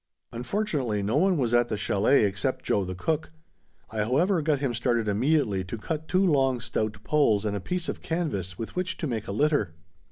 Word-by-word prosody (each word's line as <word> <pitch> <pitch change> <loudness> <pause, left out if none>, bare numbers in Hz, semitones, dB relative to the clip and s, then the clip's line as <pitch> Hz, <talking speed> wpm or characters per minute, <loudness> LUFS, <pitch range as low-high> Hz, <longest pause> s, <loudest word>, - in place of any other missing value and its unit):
Unfortunately 125 - -1
no 110 +7 +1
one 185 +2 +3
was 120 -4 0
at 120 0 +4
the 110 - -1
chalet 105 +6 +3
except 100 +6 -1
Joe 100 - +1
the 90 0 -5
cook. 160 - -1 0.6
I 110 - -4
however 160 - +2
got 150 -1 +1
him 135 -3 -1
started 120 -1 0
immediately 105 -2 +1
to 105 +6 -5
cut 155 +7 -4
two 185 +1 +3
long, 135 -6 +2
stout 110 -3 -3
poles 115 -9 +2
and 105 -1 -1
a - - -2
piece 175 - -3
of - - -4
canvas 100 - -2
with 115 - -6
which 185 0 -2
to - - -3
make 115 -7 -3
a - - -3
litter. 110 - +1
125 Hz, 200 wpm, -27 LUFS, 105-155 Hz, 0.6 s, at